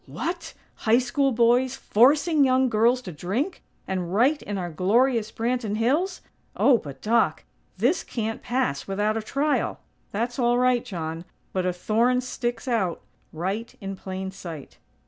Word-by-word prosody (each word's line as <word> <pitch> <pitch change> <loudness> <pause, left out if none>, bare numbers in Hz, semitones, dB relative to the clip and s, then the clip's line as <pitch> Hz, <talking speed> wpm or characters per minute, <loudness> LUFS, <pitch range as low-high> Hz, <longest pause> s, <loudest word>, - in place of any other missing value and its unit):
"What? 345 +1 -4 0.3
High 230 - +7
School 265 +2 +1
boys 245 +2 +3
forcing 290 +7 +4
young 260 -1 +3
girls 240 +3 +3
to 185 - -6
drink? 200 - -3 0.3
And 180 -2 -2
right 255 +10 +3
in 205 -1 -4
our 175 -2 -4
glorious 225 - +2
Branton 230 -2 -1
Hills? 305 - +1 0.3
Oh, 255 -5 +5
but, 140 -5 -10
Doc! 215 -8 +2 0.3
This 250 - +2
can't 225 -1 -4
pass 245 - -1
without 205 +2 0
a 225 - -1
trial!" 280 +7 0 0.3
"That's 240 +5 -2
all 240 0 +3
right, 250 -1 +3
John; 165 -7 -5 0.3
but 185 -1 0
a - - +2
thorn 230 +7 +1
sticks 245 +1 -4
out, 200 -9 0 0.3
right 195 +9 -4
in 195 -2 -5
plain 190 0 -5
sight." 165 -7 -9
230 Hz, 150 wpm, -25 LUFS, 190-255 Hz, 0.3 s, High